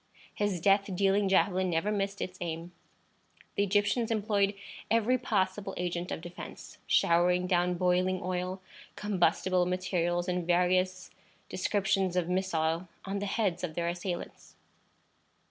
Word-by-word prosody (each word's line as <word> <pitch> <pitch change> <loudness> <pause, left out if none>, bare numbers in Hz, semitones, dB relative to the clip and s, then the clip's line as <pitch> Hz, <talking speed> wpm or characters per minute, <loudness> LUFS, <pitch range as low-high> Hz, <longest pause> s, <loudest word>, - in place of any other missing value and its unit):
His 205 -4 -1
death 195 +3 +3
dealing 195 +1 +2
javelin 190 -1 +3
never 170 +5 0
missed 200 -1 -2
its 185 0 -5
aim. 170 0 -4 0.8
The - - 0
Egyptians 205 +4 +2
employed 205 -2 +1 0.3
every 230 +3 +3
possible 195 -3 -1
agent 175 0 -2
of - - -3
defence, 175 +1 -10
showering 180 +1 +3
down 180 -1 +2
boiling 180 +1 +1
oil, 185 +1 -3 0.3
combustible 185 -2 +1
materials, 180 -1 0
and 180 -2 -1
various 185 +1 +1 0.4
descriptions 195 -1 0
of 180 -2 +1
missile, 175 -2 0 0.2
on 195 +1 -2
the 205 - -3
heads 195 -4 0
of 160 -3 -3
their 170 0 0
assailants. 175 0 -5
185 Hz, 130 wpm, -30 LUFS, 175-200 Hz, 0.8 s, death